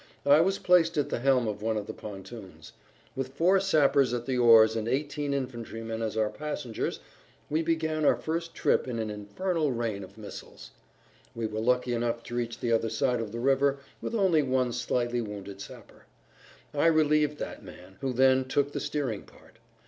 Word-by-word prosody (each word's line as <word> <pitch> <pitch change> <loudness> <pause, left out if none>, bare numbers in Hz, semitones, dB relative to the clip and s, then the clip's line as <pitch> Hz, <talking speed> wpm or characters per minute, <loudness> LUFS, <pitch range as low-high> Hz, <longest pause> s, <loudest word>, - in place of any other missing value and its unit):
I 145 +2 +7
was 190 +3 +1
placed 170 -2 +3
at 145 - +1
the - - -2
helm 130 -2 +3
of 105 -1 -4
one 110 0 0
of 105 - -3
the - - -6
pontoons. 100 0 -10 0.4
With 135 0 -4
four 185 +5 +4
sappers 140 -9 +3
at 120 -1 -4
the 130 0 -1
oars 115 -2 +6
and 110 0 -2
eighteen 145 +2 -1
infantrymen 115 -4 -4
as 110 -1 -3
our 110 -1 +1
passengers 150 -6 -4 0.5
we 155 +2 +2
began 160 -1 -1
our - - +5
first 165 +1 -4
trip - - +1
in 120 -2 -3
an 110 -1 -2
infernal 150 - -2
rain 115 -5 -2
of 95 +3 -13
missiles. 105 -2 -10 0.6
We 115 -1 -2
were 110 0 -3
lucky 125 +2 +1
enough 115 0 -1
to 120 - -7
reach 120 -1 -3
the 120 - 0
other 115 0 +2
side 125 +2 0
of 110 -3 -5
the 115 - -5
river 135 +2 +2 0.2
with - - -3
only 190 -7 +3
one 130 -3 0
slightly 120 0 -1
wounded 100 -2 -7
sapper. - - -12 0.7
I 145 +3 +3
relieved 150 -2 +3
that - - -6
man, 95 +2 -13
who 135 -1 -1
then 130 +1 +4
took 140 +2 0
the - - -3
steering 145 -7 -2
part. 110 - -20
125 Hz, 185 wpm, -28 LUFS, 115-150 Hz, 0.7 s, I